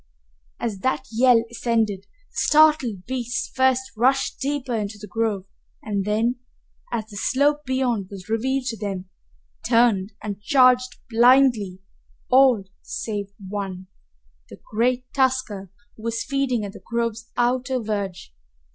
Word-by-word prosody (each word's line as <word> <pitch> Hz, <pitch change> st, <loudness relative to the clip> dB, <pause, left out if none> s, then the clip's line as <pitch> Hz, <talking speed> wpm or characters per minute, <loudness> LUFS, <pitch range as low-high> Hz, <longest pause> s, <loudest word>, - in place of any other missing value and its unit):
As 220 Hz, -5 st, -3 dB
that 260 Hz, +4 st, -1 dB
yell 235 Hz, 0 st, +5 dB
ascended, 225 Hz, -4 st, 0 dB, 0.3 s
the -, -, -28 dB
startled 300 Hz, -11 st, +3 dB
beasts 245 Hz, -2 st, -3 dB
first 260 Hz, 0 st, +3 dB
rushed 260 Hz, +4 st, +1 dB
deeper 275 Hz, -2 st, -2 dB
into 210 Hz, -2 st, -3 dB
the 210 Hz, -, -9 dB
grove 210 Hz, -1 st, -1 dB, 0.4 s
and 200 Hz, -2 st, -2 dB
then, 225 Hz, +4 st, +1 dB, 0.5 s
as 230 Hz, -3 st, -2 dB
the 205 Hz, -, -8 dB
slope 290 Hz, +6 st, +1 dB
beyond 250 Hz, -6 st, 0 dB
was 190 Hz, -3 st, -10 dB
revealed 255 Hz, +4 st, 0 dB
to 225 Hz, -, -4 dB
them, 195 Hz, -3 st, -4 dB, 0.5 s
turned 220 Hz, -4 st, +3 dB
and 205 Hz, -1 st, -5 dB
charged 255 Hz, 0 st, +4 dB
blindly, 235 Hz, -6 st, +4 dB, 0.5 s
all 255 Hz, -5 st, +6 dB, 0.2 s
save 205 Hz, -3 st, -4 dB, 0.2 s
one, 190 Hz, -2 st, -5 dB, 0.6 s
the -, -, -12 dB
great 245 Hz, +3 st, +1 dB
tusker, 255 Hz, -8 st, 0 dB, 0.3 s
who -, -, -15 dB
was 230 Hz, 0 st, -2 dB
feeding 270 Hz, -5 st, 0 dB
at 200 Hz, -, -7 dB
the -, -, -12 dB
grove's 230 Hz, -1 st, -3 dB
outer 250 Hz, +1 st, +1 dB
verge. 200 Hz, -, -4 dB
230 Hz, 130 wpm, -23 LUFS, 205-255 Hz, 0.6 s, all